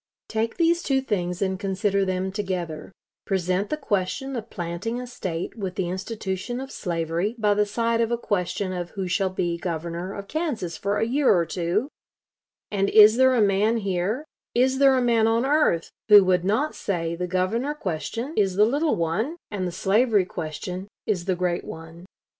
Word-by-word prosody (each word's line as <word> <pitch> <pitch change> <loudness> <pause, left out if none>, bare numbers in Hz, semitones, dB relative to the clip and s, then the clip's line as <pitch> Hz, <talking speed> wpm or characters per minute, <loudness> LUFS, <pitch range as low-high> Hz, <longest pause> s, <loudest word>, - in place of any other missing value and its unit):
Take 225 +1 -1
these 340 0 +3
two 270 -2 +1
things 180 -7 -2
and 190 -1 -1
consider 200 0 0
them 185 0 -1
together; 185 -6 -4 0.4
present 190 0 0
the 305 - -1
question 205 +1 -2
of 230 -1 -5
planting 175 +7 -4
a 250 - -5
State 185 -9 -5
with 190 -5 -4
the 180 -2 -1
institution 190 +4 -4
of 270 +1 -7
slavery 170 - -2
by 210 -2 +3
the 210 0 +1
side 230 +2 0
of 230 - +1
a 235 - +1
question 190 -3 -2
of 175 -1 -4
who 190 -1 -2
shall 190 +1 +1
be 175 -2 -2
Governor 170 +2 -4
of 200 0 -7
Kansas 265 - -2
for 200 +5 -1
a 225 - +1
year 265 +4 +3
or 170 -3 +3
two, 175 - -1 0.8
and 200 -1 +1
is 215 +1 +8
there 260 0 +5
a 235 - +3
man 205 +3 +2
here, 200 - -1 0.3
is 260 +2 +3
there 270 -1 +6
a 255 - +2
man 230 -2 +3
on 230 +2 +2
earth, 280 - +2 0.2
who 205 -1 +10
would 180 -1 +2
not 225 +11 +1
say 170 -4 -2
the 180 +1 -3
governor 215 +11 0
question 230 - -4
is 195 -3 +2
the 210 +2 +5
little 290 +7 +1
one, 190 - -1 0.2
and 190 -3 -2
the - - -3
slavery 205 +2 +2
question 180 +3 -5 0.2
is 180 -5 -1
the 190 -1 +1
great 175 -1 -1
one? 165 +2 -10
200 Hz, 185 wpm, -25 LUFS, 180-230 Hz, 0.8 s, who